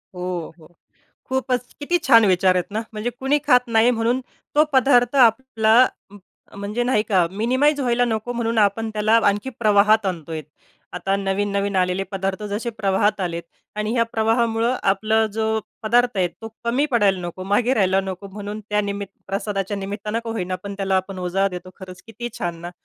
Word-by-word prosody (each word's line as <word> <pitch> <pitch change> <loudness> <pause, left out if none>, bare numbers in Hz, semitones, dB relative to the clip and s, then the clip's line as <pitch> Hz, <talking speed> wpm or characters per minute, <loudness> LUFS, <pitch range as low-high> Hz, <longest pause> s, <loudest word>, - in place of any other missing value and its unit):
हो, 180 -2 -4
हो, 155 - -16 0.6
खूपच 255 -2 -2
किती 350 +5 +1
छान 230 -4 +7
विचार 185 0 +3
आहेत 180 +2 -1
ना, 220 +2 -1
म्हणजे 220 +3 -3
कोणी 275 +3 +2
खात 250 0 +6
नाही 230 +1 +4
म्हणून 240 +2 0 0.3
तो 300 +1 +5
पदार्थ 250 -2 +4
आपला 225 -2 +3 0.4
उम्म, 205 -1 -14 0.4
म्हणजे 210 +4 -2
नाही 240 -4 +2
का, 185 -4 +3
मिनिमाईज 260 +9 +1
व्हायला 245 -2 +2
नको 225 +1 -2
म्हणून 230 -1 -1
आपण 215 +2 +2
त्याला 215 +1 +3
आणखी 205 +5 +1
प्रवाहात 210 0 +4
आणतोय. 165 -3 -4 0.5
आता 195 - -1
नवीन-नवीन 200 0 -1
आलेले 180 +1 +1
पदार्थ 195 +1 -2
जसे 225 +4 -2
प्रवाहात 205 -1 0
आलेत 170 -2 -3 0.3
आणि 210 +1 -1
ह्या 230 -2 +3
प्रवाहामुळे 225 +1 +1 0.2
आपला 220 +2 +2
जो 220 0 -1 0.4
पदार्थ 240 +1 +2
आहे, 185 -2 +2
तो 225 +5 -11 0.2
कमी 250 +6 +1
पडायला 205 -6 +2
नको, 175 +2 -7
मागे 225 +6 +2
राहायला 190 -2 +2
नको, 190 0 -6
म्हणून 205 +2 -7
त्या 210 - +2
निमित 200 0 -4 0.2
प्रसादाच्या 195 0 -3
निमित्ताने 205 +2 -4
का 230 - -4
होईना, 185 -5 -3
पण 200 0 -6
त्याला 195 -1 +1
आपण 190 0 -3
उजाळा 185 +2 0
देतो. 180 0 -8
खरंच 185 -1 -11
किती 230 +2 -6
छान 175 -1 -3
ना, 175 +1 -6
210 Hz, 175 wpm, -22 LUFS, 195-235 Hz, 0.6 s, छान